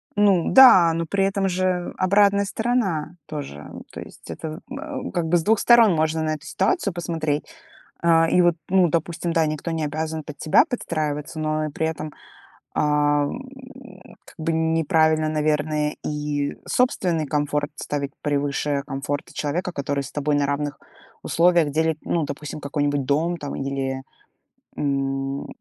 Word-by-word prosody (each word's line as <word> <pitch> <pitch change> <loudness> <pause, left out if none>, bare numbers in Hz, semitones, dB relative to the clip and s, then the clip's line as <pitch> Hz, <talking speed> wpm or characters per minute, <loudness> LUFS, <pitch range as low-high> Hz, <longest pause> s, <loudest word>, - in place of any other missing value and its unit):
Ну 200 -5 +3
да, 185 -11 +8
но 165 0 -2
при 195 +4 +1
этом 195 0 0
же 180 -1 -1
обратная 200 +1 +3
сторона 195 -8 -1
тоже. 140 - -7 0.2
То - - -8
есть - - -13
это, 160 +2 -6
э, 275 -2 -5
как 175 -3 0
бы 175 +2 +3
с 165 - -2
2 220 +2 +3
сторон 230 -5 +6
можно 160 0 0
на 155 0 0
эту 155 0 -13
ситуацию 270 - 0
посмотреть. 160 -4 -2 0.6
А, 165 -1 +4
и 180 - +4
вот, 175 -1 +4
ну, 185 -2 +4
допустим, 170 +1 -2
да, 165 -2 +2
никто 155 +2 -3
не 160 -2 -1
обязан 155 +1 -3
под 150 -1 -9
тебя 155 - +4
подстраиваться, 155 - -3
но 155 0 -1
и - - -5
при 160 +2 -2
этом, 155 -1 -4 0.6
а, 145 0 +2
м, 260 - -10
как - - -16
бы 165 +1 -1
неправильно, 160 -1 +2
наверное, 150 0 0
и 145 -1 -2
собственный 180 -10 +1
комфорт 145 0 -1
ставить 140 -3 -3
превыше 145 -1 -1
комфорта 140 +2 -4
человека, 170 +5 -2
который 140 -1 -2
с 130 - -9
тобой 145 0 0
на 145 0 +2
равных 145 0 -2 0.4
условиях 170 -3 +3
делит, 160 +1 +1
ну, 170 - 0
допустим, 145 +1 -6
какой-нибудь 145 -1 -1
дом 160 +5 +1
там 145 -2 -6
или, 135 -1 -3 0.8
м, 135 -1 -2
155 Hz, 155 wpm, -23 LUFS, 145-175 Hz, 0.8 s, да